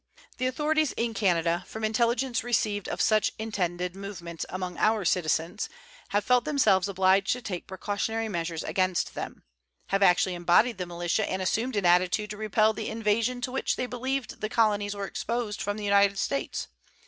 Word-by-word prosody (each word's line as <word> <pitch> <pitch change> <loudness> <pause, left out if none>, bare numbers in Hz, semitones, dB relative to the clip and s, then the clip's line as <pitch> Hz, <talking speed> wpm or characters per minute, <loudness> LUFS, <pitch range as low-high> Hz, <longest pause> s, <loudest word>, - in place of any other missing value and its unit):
The 255 - +1
authorities 305 +2 +1
in 230 0 -1
Canada, 175 -4 +1
from 220 - -7
intelligence 235 +3 +1
received 215 -4 0
of - - -2
such 215 -1 +3
intended 180 -5 -2
movements 180 -4 -6
among 185 -1 -5
our 215 -2 +2
citizens, 170 +3 0 0.4
have 205 +1 +1
felt 250 +2 +3
themselves 215 -11 +3
obliged 190 +1 +3
to 250 - -6
take 180 -5 -5
precautionary 205 +4 -2
measures 165 -4 -3
against 185 -2 0
them; - - -6 0.5
have 195 0 +1
actually 185 0 +4
embodied 175 +6 +3
the 180 - -3
militia 175 +4 -1
and 190 - -2
assumed 225 +7 -1
an 200 -3 0
attitude 180 +4 +3
to 210 - -6
repel 215 +1 +2
the 220 - -4
invasion 225 +3 0
to 250 - -3
which 265 - 0
they 255 - -2
believed 250 -1 -3
the 215 - -2
colonies 205 -3 +1
were 200 -1 -3
exposed 230 +1 -3
from 205 +1 -2
the 210 - -5
United 200 0 +4
States. 275 +7 -2
205 Hz, 170 wpm, -27 LUFS, 185-225 Hz, 0.5 s, actually